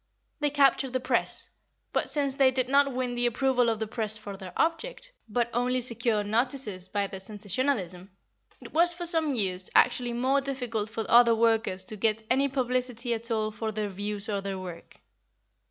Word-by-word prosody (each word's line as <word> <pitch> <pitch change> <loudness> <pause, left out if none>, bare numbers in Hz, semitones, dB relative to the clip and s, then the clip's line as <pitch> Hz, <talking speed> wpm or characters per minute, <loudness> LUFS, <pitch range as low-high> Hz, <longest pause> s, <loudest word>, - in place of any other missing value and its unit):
They 295 -1 +1
captured 275 -2 +3
the 255 - +1
press, 255 - +1 0.4
but, - - 0
since 280 -2 +1
they 270 -1 +4
did 255 -1 -1
not 275 +1 +3
win 250 -1 -2
the 240 0 +1
approval 250 0 +2
of 225 - 0
the 220 - -2
press 215 -1 -2
for 205 -2 -8
their 190 -2 -9
object, - - -1 0.2
but 235 +2 0
only 250 +2 +1
secured 230 -3 +1
notices 220 -4 -1
by 200 +1 -1
their 195 -1 -7
sensationalism, 200 -2 -2 0.5
it - - -12
was, 345 +2 +4
for 345 0 -6
some 320 -5 +2
years, 185 -4 0
actually 245 -1 +3
more 260 +4 +1
difficult 245 -6 -3
for 225 0 -4
other 235 -1 +6
workers 225 -4 +1
to 215 - -3
get 220 +1 +1
any 270 +2 +3
publicity 250 -2 -1
at 230 +1 0
all 215 -1 0
for 220 +1 -4
their 210 -1 -3
views 205 +2 -4
or 200 -2 -2
their 195 -1 -4
work. 180 -2 -9
235 Hz, 185 wpm, -27 LUFS, 210-265 Hz, 0.5 s, other